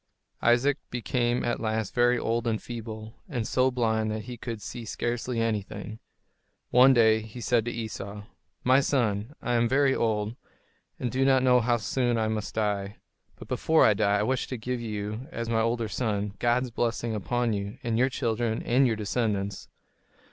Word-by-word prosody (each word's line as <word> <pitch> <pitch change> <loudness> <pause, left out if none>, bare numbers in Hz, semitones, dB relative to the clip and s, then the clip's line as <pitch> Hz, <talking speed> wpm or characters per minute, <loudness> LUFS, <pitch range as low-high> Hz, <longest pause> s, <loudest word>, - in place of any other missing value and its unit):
Isaac 130 +4 +3
became 120 0 0
at 120 - -1
last 110 -2 -2
very 120 0 +3
old 115 0 -1
and 110 -2 0
feeble, 110 -2 -7 0.2
and 120 -8 -2
so 130 0 +3
blind 110 -3 0
that 110 0 -3
he 125 +2 -7
could 115 -1 -6
see 120 +3 -7
scarcely 120 +2 -2
anything. 110 -1 -3 0.7
One 130 +2 +7
day 110 -3 +5
he 110 +2 -10
said 120 -1 +1
to 120 - -2
Esau: 105 -3 -6 0.4
"My 130 +2 +5
son, 120 -2 0
I 120 - 0
am 120 -1 +2
very 135 0 +3
old, 110 -2 0 0.6
and 120 - -2
do 130 +1 +1
not 135 -1 +4
know 125 -1 +5
how 120 +1 +2
soon 120 +1 0
I 110 -1 +1
must 110 -2 -3
die. 105 -2 -1 0.4
But - - -12
before 160 0 +3
I 110 - +6
die, 100 0 +2
I 105 - +1
wish 130 +3 0
to 130 - -4
give 125 +2 -3
to 120 - -6
you, 105 +4 -4
as 115 -7 -4
my 115 -1 +2
older 115 0 0
son, 105 -2 -2
God's 120 +1 +1
blessing 115 0 -1
upon 120 +3 0
you, 100 0 -4
and 115 -1 0
your 130 +2 +4
children, 115 -2 -1
and 130 +3 +3
your 115 - +1
descendants. 105 -2 -2
115 Hz, 185 wpm, -27 LUFS, 110-125 Hz, 0.7 s, One